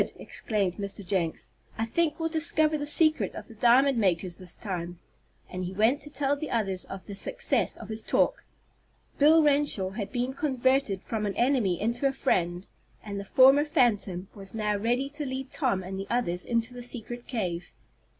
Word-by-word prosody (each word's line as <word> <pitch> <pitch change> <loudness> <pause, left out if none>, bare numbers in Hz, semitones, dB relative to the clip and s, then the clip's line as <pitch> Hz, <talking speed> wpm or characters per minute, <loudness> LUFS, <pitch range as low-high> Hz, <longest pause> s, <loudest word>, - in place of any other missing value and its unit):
exclaimed 200 -5 -2
Mr. 200 -1 -6
Jenks. 175 -3 -2 0.3
"I 225 - 0
think 315 +6 0
we'll 325 - 0
discover 315 -1 +1
the 290 -1 -3
secret 310 +1 +4
of - - -7
the 230 - -11
diamond 245 +3 +4
makers 180 -3 0
this 180 -2 -3
time," 175 -3 -5 0.5
and 185 0 -5
he 180 - -5
went 225 +8 +2
to 295 - -6
tell 285 -1 0
the 295 +1 -6
others 195 -5 -1
of 195 -1 -9
the 200 - -8
success - - 0
of 220 - -10
his 220 0 -2
talk. - - +1 0.8
Bill 310 +2 +6
Renshaw 285 -10 +2
had 200 0 -5
been 250 +1 -2
converted 260 -7 0
from 215 -2 -2
an 195 - -3
enemy 240 -8 +1
into 235 +5 0
a 270 - -1
friend, 175 -9 0 0.4
and 200 -2 -5
the - - -5
former 270 +7 +6
phantom 210 - +1
was 195 0 -6
now 210 -1 0
ready 240 +6 0
to 295 +1 -4
lead 265 -1 -5
Tom 235 -10 0
and 190 +1 -6
the 195 - -5
others 180 -8 -1
into 235 +1 -1
the 245 - -8
secret 240 0 -5
cave. 180 -8 -3
230 Hz, 185 wpm, -27 LUFS, 195-275 Hz, 0.8 s, Bill